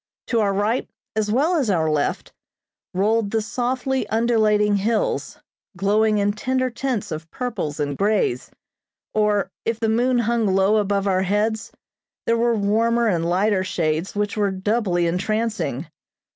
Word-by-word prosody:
To 230 - +2
our 205 -2 +2
right, 210 +5 0 0.3
as 215 -1 0
well 290 +10 +2
as 265 -8 0
our 165 -5 +2
left, 150 -2 -1 0.6
rolled 210 +3 +1
the 225 - 0
softly 255 +4 -1
undulating 215 -2 +2
hills, 215 +3 -1 0.4
glowing 210 +3 +2
in 205 0 +1
tender 255 +4 -1
tints 240 -2 -3
of 155 +1 -6
purples 220 - -4
and 145 -1 -1
greys, 200 - 0 0.6
or, 210 -2 +1
if 230 -1 -2
the 225 -1 0
moon 245 +3 +2
hung 235 -1 +1
low 195 +2 +3
above 200 -1 0
our 190 -2 +2
heads, 210 +3 0 0.5
there 230 - +2
were 235 0 +2
warmer 225 +3 +2
and 170 -6 +1
lighter 190 +2 +2
shades 165 -1 -1
which 205 0 -1
were 205 -2 +1
doubly 190 -2 0
entrancing. 200 - -1
210 Hz, 145 wpm, -22 LUFS, 195-230 Hz, 0.6 s, low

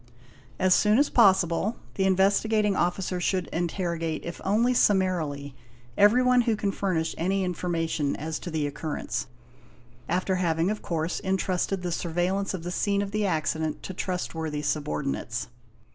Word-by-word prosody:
As 185 0 +4
soon 210 +3 +4
as 285 +2 +3
possible, 195 -1 +4 0.2
the 190 - 0
Investigating 200 +2 +3
Officer 180 0 -1
should 185 0 0
interrogate, 170 -2 -2
if 170 - -6
only 230 +6 +2
summarily, 170 - +1 0.4
everyone 250 +4 +5
who 230 -2 +1
can 205 -1 -1
furnish 180 -5 -1
any 190 +3 +1
information 165 -4 -1
as 160 +1 -4
to 180 - -6
the 155 -3 -1
occurrence, 150 +1 -4 0.8
after 185 +2 0
having 170 +1 +1
of 215 - -4
course 165 0 -2
intrusted 190 -1 -1
the 175 - -2
surveillance 180 +4 -1
of 170 - -7
the 175 - -4
scene 200 +2 +1
of 200 - -5
the 210 -1 0
accident 160 -2 -1
to 190 - -5
trustworthy 160 -5 -3
subordinates. 140 -5 -2
180 Hz, 145 wpm, -26 LUFS, 160-195 Hz, 0.8 s, everyone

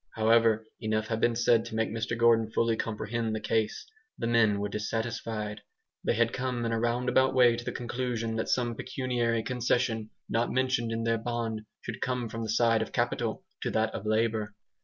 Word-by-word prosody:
However, 110 0 +4
enough 110 0 -1
had 110 -1 -1
been 120 -1 +3
said 115 -1 +4
to 115 - -6
make 110 0 0
Mr 115 +1 -2
Gordon 115 -1 +4
fully 115 0 +1
comprehend 110 +1 -2
the - - -2
case. 110 +1 -1 0.3
The - - -3
men 115 -3 +3
were 100 - -1
dissatisfied. 110 0 -3 0.4
They - - +1
had 115 +1 +2
come 125 -2 -2
in 115 - 0
a 115 - 0
roundabout 125 +3 +2
way 120 -2 +6
to 120 - -6
the - - -3
conclusion 120 -2 -3
that 110 - -2
some 120 -2 +1
pecuniary 120 -2 -1
concession, 120 -3 0 0.2
not 115 +1 0
mentioned 130 -3 +1
in 115 0 -2
their 115 0 +1
bond, 115 -1 -2 0.2
should - - -6
come 125 -2 -1
from 115 +1 -5
the 110 - -4
side 115 0 +3
of 110 - -3
capital - - -1 0.2
to - - -1
that 110 0 0
of 105 - -5
labour. 110 -1 0
115 Hz, 190 wpm, -29 LUFS, 110-120 Hz, 0.4 s, way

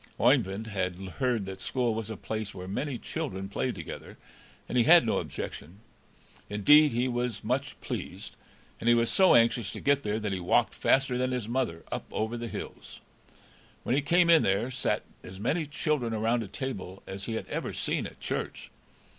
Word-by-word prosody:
Oeyvind 95 +4 +3
had 95 -4 -2
heard 105 +4 -1
that 95 0 -7
school 125 -3 0
was 110 -1 -4
a 110 - -5
place 110 -2 -4
where 90 -1 -7
many 130 +7 -2
children 115 -11 -4
played 100 - -2
together, - - -8 0.5
and - - -4
he 120 -2 +4
had 170 -3 +8
no 110 - +1
objection. 85 +7 -6 0.7
Indeed, 150 +9 +6
he 120 +2 +1
was 120 -3 -2
much 125 +4 -2
pleased, - - -6 0.4
and 115 - +1
he 120 - +7
was 115 0 +2
so 190 -1 +6
anxious 115 -3 +3
to - - -6
get 140 0 +2
there 105 -1 -1
that 105 -2 -2
he 95 - -2
walked 90 - +2
faster 135 -2 +2
than 130 0 +1
his 125 -4 -2
mother 115 -10 -1
up - - -3
over 110 +2 -2
the 120 0 -4
hills. - - -8 0.8
When - - 0
he 140 - +3
came 170 +5 +4
in 165 - +7
there 100 +6 +1
sat 130 - 0 0.2
as 95 +1 -10
many 150 - 0
children 145 -6 -1
around 115 +2 +1
a 110 - -5
table 95 -4 -6
as 95 +1 -6
he 115 - -3
had - - -3
ever - - -3
seen - - -2
at - - -15
church. - - -4
115 Hz, 190 wpm, -29 LUFS, 100-130 Hz, 0.8 s, had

